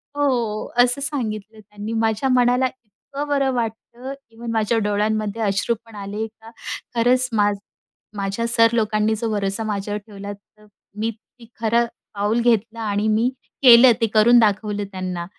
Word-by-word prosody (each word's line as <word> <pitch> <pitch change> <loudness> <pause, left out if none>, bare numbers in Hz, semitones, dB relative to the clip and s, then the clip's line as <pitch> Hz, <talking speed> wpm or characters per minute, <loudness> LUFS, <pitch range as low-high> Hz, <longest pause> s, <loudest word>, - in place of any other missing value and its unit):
हो. 245 -7 0 0.2
असं 245 +3 0
सांगितलं 220 -7 -4
त्यांनी 210 +1 -7
माझ्या 220 +4 +1
मनाला 250 0 +3
इतकं 260 +4 -9
बरं 275 -2 +1
वाटतं. 240 +2 -4 0.2
इव्हन 230 +1 -7
माझ्या 225 0 +1
डोळ्यांमध्ये 210 +1 0
अश्रूपण 220 +2 -1
आले. 205 +2 -4
का 225 +1 -16 0.4
खरंच 250 +2 +3
मा 205 -2 +3 0.7
माझ्या 200 +4 -2
सर 230 0 +3
लोकांनी 215 -1 +1
जो 225 +1 -2
भरोसा 200 +1 -1
माझ्यावर 205 -1 -3
ठेवला. 200 -1 -7
तर 210 +1 -21 0.3
मी 225 +2 -1
ते 230 +2 -20
खरं 235 +1 +2 0.3
पाऊल 205 +3 +1
घेतलं 230 -1 +1
आणि 210 -1 -1
मी 220 +3 +2 0.3
केलं, 245 0 +9
ते 225 - +3
करून 235 +3 +6
दाखवलं 210 -1 +1
त्यांना. 185 -2 -4
220 Hz, 145 wpm, -21 LUFS, 210-235 Hz, 0.7 s, केलं